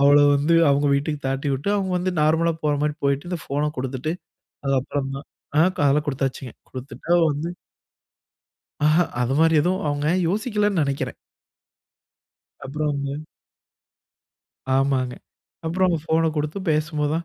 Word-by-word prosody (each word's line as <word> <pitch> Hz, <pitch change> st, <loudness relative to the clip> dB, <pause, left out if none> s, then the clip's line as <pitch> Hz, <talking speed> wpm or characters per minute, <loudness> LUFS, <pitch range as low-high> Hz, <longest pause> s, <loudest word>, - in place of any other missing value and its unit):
அவள 140 Hz, +1 st, +6 dB, 0.2 s
வந்து 145 Hz, +4 st, +2 dB, 0.2 s
அவங்க 140 Hz, +1 st, +2 dB
வீட்டுக்கு 145 Hz, +1 st, -1 dB
தாட்டிவிட்டு 135 Hz, +5 st, -1 dB
அவங்க 190 Hz, -2 st, -1 dB
வந்து 185 Hz, +1 st, -1 dB
நார்மலா 160 Hz, +2 st, +3 dB
போற 150 Hz, -1 st, +2 dB
மாரி 150 Hz, 0 st, 0 dB
போய்ட்டு 140 Hz, +4 st, 0 dB
இந்த 180 Hz, -, -2 dB
ஃபோன 145 Hz, +2 st, -1 dB
கொடுத்துட்டு 130 Hz, +4 st, -2 dB, 0.5 s
அதுக்கப்புறம் 135 Hz, 0 st, -1 dB
தான் 140 Hz, -, -9 dB, 0.3 s
ஆ -, -, +7 dB
க -, -, -14 dB
அதெல்லாம் 150 Hz, +2 st, +2 dB
கொடுத்தாச்சுங்க 135 Hz, -2 st, -2 dB, 0.2 s
கொடுத்துட்டா 130 Hz, +5 st, -9 dB
அவ 175 Hz, -, +4 dB
வந்து 150 Hz, +4 st, -3 dB, 1.4 s
ஆஹா 155 Hz, +3 st, +4 dB, 0.2 s
அது 125 Hz, +2 st, +1 dB
மாரி 160 Hz, 0 st, +4 dB
எதுவும் 180 Hz, +4 st, 0 dB
அவங்க 145 Hz, 0 st, -1 dB, 0.2 s
யோசிக்கலன்னு 210 Hz, -, +1 dB
நினைக்கிறேன். 140 Hz, -1 st, -2 dB, 1.5 s
அப்புறம்ங்க 140 Hz, 0 st, -2 dB, 1.7 s
ஆமாங்க 135 Hz, -2 st, +1 dB, 0.5 s
அப்புறம் 185 Hz, +2 st, +2 dB
ஃபோன 160 Hz, 0 st, +2 dB
கொடுத்து 150 Hz, +4 st, -2 dB
பேசும்போதுதான் 155 Hz, +1 st, 0 dB
150 Hz, 125 wpm, -23 LUFS, 140-165 Hz, 1.7 s, ஆ